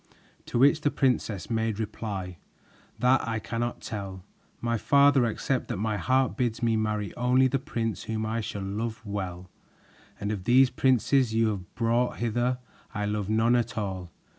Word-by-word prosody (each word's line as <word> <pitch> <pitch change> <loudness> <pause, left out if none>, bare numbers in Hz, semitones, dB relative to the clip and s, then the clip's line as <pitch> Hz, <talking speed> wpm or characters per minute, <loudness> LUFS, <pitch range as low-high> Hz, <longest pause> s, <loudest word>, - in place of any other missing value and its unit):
To - - -2
which 140 +5 +5
the 145 - +2
princess 120 -9 0
made 110 -1 0
reply: 100 -5 -4 0.6
"That 125 0 +3
I 115 -1 -1
cannot 115 +2 -3
tell, 95 -4 -6 0.4
my 115 0 0
father, 140 +2 +4
except 125 +3 -1
that 120 - -3
my 105 +1 -1
heart 130 +3 +1
bids 120 -2 -1
me 115 -1 +3
marry 105 -1 -1
only 125 +2 +3
the 135 +1 0
prince 115 -4 -3
whom 110 0 -2
I 115 +1 -1
shall 100 -2 -5
love 110 +3 -4
well, 95 -3 -5 0.7
and 100 - -2
of 95 -4 -4
these 125 +2 +5
princes 130 -2 +2
you 115 0 +3
have 95 -4 -6
brought 120 +1 +1
hither 120 +2 0 0.4
I 105 - -1
love 105 -1 -2
none 110 +2 +3
at 120 0 -1
all. 95 -4 -3
115 Hz, 165 wpm, -27 LUFS, 105-125 Hz, 0.7 s, which